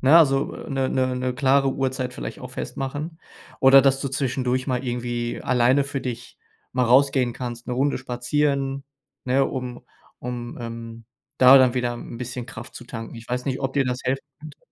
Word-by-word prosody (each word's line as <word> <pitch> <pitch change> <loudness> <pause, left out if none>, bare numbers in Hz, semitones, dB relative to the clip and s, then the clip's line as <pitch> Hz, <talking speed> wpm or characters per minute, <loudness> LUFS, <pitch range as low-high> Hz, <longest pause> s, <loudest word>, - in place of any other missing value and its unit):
ne, 140 +5 +6
also, 135 -4 +4
äh, - - -9
'ne 135 -1 0
'ne 130 -1 0
'ne 125 0 -2
klare 135 +1 +3
Uhrzeit 130 -1 -2
vielleicht - - -6
auch - - -8
festmachen, 145 +5 -5 0.4
oder 135 0 +8
dass 135 0 +3
du 140 - -2
zwischendurch 130 -1 -1
mal 125 -3 -1
irgendwie 120 -1 -3
alleine 130 +2 +3
für 140 0 -4
dich 120 -1 -6 0.3
mal 125 0 +2
rausgehen 130 0 +4
kannst, 120 -2 -6
'ne 125 - -2
Runde 140 +3 +1
spazieren, 135 +2 -1 0.4
ne, 130 +2 +3
um 125 -2 -5 0.4
um, 120 -1 -5
ähm, 115 -1 -7 0.3
da 130 +1 +9
dann 130 -1 +4
wieder 125 -1 0
'n 120 - -8
bisschen 125 0 -5
Kraft 115 -1 -9
zu 120 - -9
tanken. 115 -1 -7
Ich 115 0 -11
weiß 125 0 -2
nicht, 135 -2 -2
ob 135 -1 -2
dir 140 -1 +3
das 125 -1 -1
helfen 135 +2 0 0.2
könnte. 150 -1 -11
130 Hz, 190 wpm, -24 LUFS, 120-135 Hz, 0.4 s, da